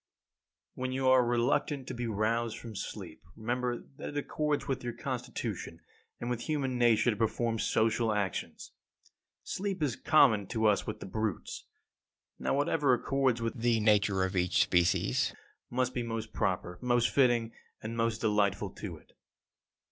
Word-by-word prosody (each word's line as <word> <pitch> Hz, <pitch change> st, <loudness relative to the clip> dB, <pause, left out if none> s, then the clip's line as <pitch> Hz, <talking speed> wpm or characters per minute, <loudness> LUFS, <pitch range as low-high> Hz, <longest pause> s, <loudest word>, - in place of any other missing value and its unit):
12. -, -, -10 dB
When 130 Hz, -, -1 dB
you 130 Hz, 0 st, 0 dB
are 130 Hz, -1 st, +6 dB
reluctant 130 Hz, +4 st, +1 dB
to -, -, -4 dB
be 120 Hz, -1 st, -3 dB
roused 115 Hz, +2 st, 0 dB
from 115 Hz, -2 st, -9 dB
sleep, -, -, -7 dB
remember 120 Hz, +2 st, -2 dB
that -, -, -5 dB
it 145 Hz, -, -6 dB
accords 150 Hz, 0 st, -1 dB
with 135 Hz, -2 st, -2 dB
your 120 Hz, -1 st, -3 dB
constitution -, -, -4 dB, 0.4 s
and 120 Hz, -, -4 dB
with 120 Hz, +3 st, -3 dB
human 135 Hz, -5 st, 0 dB
nature 120 Hz, 0 st, +4 dB
to -, -, -3 dB
perform 115 Hz, +1 st, 0 dB
social 115 Hz, +1 st, +2 dB
actions. 100 Hz, -3 st, -3 dB, 0.7 s
Sleep 190 Hz, -4 st, -3 dB
is 130 Hz, -5 st, 0 dB
common 115 Hz, -12 st, +4 dB
to 110 Hz, -2 st, -1 dB
us 105 Hz, -2 st, +3 dB
with -, -, -5 dB
the -, -, -5 dB
brutes. 110 Hz, +1 st, -3 dB, 0.7 s
Now, -, -, 0 dB
whatever 145 Hz, -2 st, +3 dB
accords 130 Hz, -2 st, 0 dB
with 115 Hz, -, -1 dB
the 120 Hz, -1 st, +3 dB
nature 105 Hz, -3 st, +3 dB
of 95 Hz, +1 st, -2 dB
each 90 Hz, -1 st, +3 dB
species 85 Hz, -8 st, +2 dB, 0.3 s
must 125 Hz, 0 st, 0 dB
be 125 Hz, -, -1 dB
most 115 Hz, -1 st, -4 dB
proper, 90 Hz, -1 st, -1 dB
most 120 Hz, -1 st, +2 dB
fitting, 120 Hz, -4 st, +3 dB, 0.3 s
and 110 Hz, +1 st, -4 dB
most 115 Hz, -1 st, 0 dB
delightful 100 Hz, -2 st, +1 dB
to 90 Hz, -5 st, -7 dB
it. -, -, -22 dB
115 Hz, 160 wpm, -31 LUFS, 110-130 Hz, 0.7 s, are